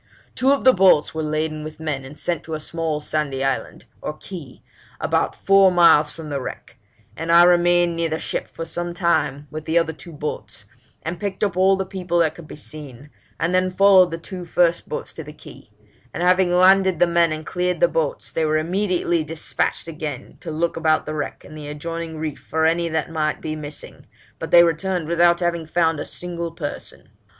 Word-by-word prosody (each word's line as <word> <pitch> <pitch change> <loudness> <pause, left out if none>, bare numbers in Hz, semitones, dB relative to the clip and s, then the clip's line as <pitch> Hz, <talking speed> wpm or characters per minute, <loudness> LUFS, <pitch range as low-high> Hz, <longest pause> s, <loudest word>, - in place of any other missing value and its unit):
Two 265 +2 +2
of 280 - +1
the 260 - +7
boats 185 -5 +4
were 160 - -3
laden 155 0 -2
with 155 0 -9
men 150 -4 -3
and 135 +3 -11
sent 175 -3 -2
to 160 - -5
a - - -4
small 160 -1 -3
sandy 145 -3 -2
island 135 -1 -2 0.2
(or 150 - -5
key) 160 -9 -10 0.4
about - - 0
four 195 -1 +5
miles 170 -4 +5
from 160 -1 -9
the 140 -1 -2
wreck; - - -8 0.4
and 165 +1 -3
I 170 +1 +8
remained 175 -1 +4
near 165 0 0
the 160 - -1
ship - - -3
for 165 - -7
some 175 +1 -4
time 170 -5 0
with 155 0 -6
the 160 +1 +1
other 165 -1 +1
two 170 +2 -12
boats, 110 -10 -6 0.4
and 170 +2 -4
picked 200 -1 -3
up 200 -4 0
all 190 +1 +4
the 190 0 -2
people 180 -2 -3
that 165 -2 +3
could 170 -3 -12
be - - -9
seen, 145 -2 -10 0.3
and 170 +2 0
then 185 0 +2
followed 190 -1 +5
the 165 - -4
two 180 +2 -8
first 170 0 +1
boats - - -5
to 160 - -7
the 150 0 -10
key; 150 - -14 0.5
and 175 - -2
having 180 0 +3
landed 190 0 +5
the - - +6
men 170 -1 +2
and 155 0 -5
cleared 180 -1 -1
the 175 - +5
boats, 160 -3 -2
they 160 - -1
were 155 0 +2
immediately 175 0 0
despatched 160 +1 -2
again 155 -5 -6
to - - -8
look 165 +2 -1
about 160 -1 +1
the 155 - -4
wreck 150 -2 -5
and 155 - -12
the 150 -1 -8
adjoining 165 +2 -5
reef 155 -2 -4
for 160 0 -1
any 170 +1 +2
that 160 0 -2
might 155 -2 -1
be 155 -1 -4
missing, 150 -1 -9 0.3
but - - -5
they 170 0 +8
returned 175 0 -1
without 170 +1 +3
having 170 -2 -1
found 165 -1 +1
a - - -4
single 170 -1 -5
person. 160 -3 -7
165 Hz, 210 wpm, -22 LUFS, 155-175 Hz, 0.5 s, I